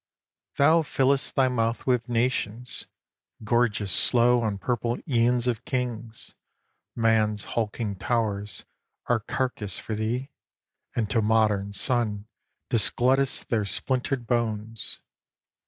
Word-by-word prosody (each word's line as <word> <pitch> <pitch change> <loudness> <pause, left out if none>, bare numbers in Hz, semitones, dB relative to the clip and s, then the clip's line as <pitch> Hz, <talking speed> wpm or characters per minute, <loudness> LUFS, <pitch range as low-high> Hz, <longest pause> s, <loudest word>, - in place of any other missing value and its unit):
Thou 160 +4 +5
fill'st 135 -2 +1
thy 135 -1 +4
mouth 115 -2 -1
with 125 -2 +1
nations, 120 -1 -1 0.6
gorgest 110 -4 +1
slow 120 0 +5
On 105 -3 -1
purple 120 +2 -1
æons 120 -2 +2
of 120 -3 -1
kings; 120 -3 -4 0.6
man's 110 -2 +2
hulking 110 -2 -2
towers 105 -2 -2 0.4
Are 120 -2 +2
carcase 110 -4 -3
for 110 - -5
thee, 115 +6 -2 0.6
and 110 -3 0
to 115 - +2
modern 105 -2 +1
sun 105 -3 0 0.5
Disglutt'st 130 +4 +2
their 110 -3 +1
splintered 130 +4 -2
bones. 115 -2 -2
115 Hz, 105 wpm, -26 LUFS, 110-125 Hz, 0.6 s, Thou